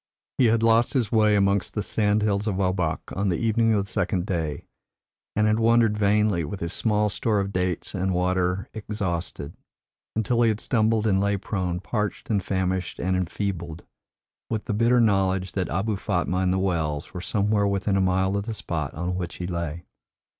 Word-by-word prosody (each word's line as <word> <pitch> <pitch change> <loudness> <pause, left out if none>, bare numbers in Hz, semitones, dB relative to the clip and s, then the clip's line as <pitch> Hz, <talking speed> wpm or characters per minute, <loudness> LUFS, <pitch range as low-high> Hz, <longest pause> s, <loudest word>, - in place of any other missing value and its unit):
He 130 - +5
had 115 0 +3
lost 115 +1 +4
his 120 -5 0
way 105 -2 +4
amongst 100 -1 +1
the 105 - -1
sandhills 105 -1 +1
of 100 - 0
Obak 90 -4 -1
on 100 +1 0
the 85 - 0
evening 115 0 +2
of 100 -1 0
the - - -10
second 90 -3 0
day, 80 -7 -3 0.7
and 105 - +3
had 110 +1 +2
wandered 115 -1 +4
vainly, 105 -3 +2
with 95 +6 -5
his 85 0 -4
small 105 -2 +1
store 105 +2 0
of 100 0 -2
dates 90 -2 -2
and 95 -1 -1
water 90 +1 0
exhausted, 90 -8 -4 0.6
until 115 +2 +1
he 115 - +5
had 110 -1 -1
stumbled 110 -3 +1
and 95 -3 +2
lay 100 0 +1
prone, 90 -3 -2
parched 105 +1 -3
and 100 -3 +1
famished 95 -1 -1
and 95 +1 0
enfeebled, 85 -2 -3 0.7
with 110 -1 -2
the 110 - -2
bitter 120 +3 +3
knowledge 95 -4 +2
that 95 -2 -2
Abou 100 +6 -1
Fatma 90 -2 -1
and 95 -1 +1
the 95 - +1
Wells 80 -6 -1
were 90 - -5
somewhere 100 +1 +1
within 100 0 0
a 95 - +2
mile 95 +1 +1
of 100 0 -2
the 115 - -3
spot 80 -8 -4
on 90 +3 -2
which 90 -1 -4
he 90 - -5
lay. 85 -2 -4
100 Hz, 190 wpm, -25 LUFS, 90-105 Hz, 0.7 s, He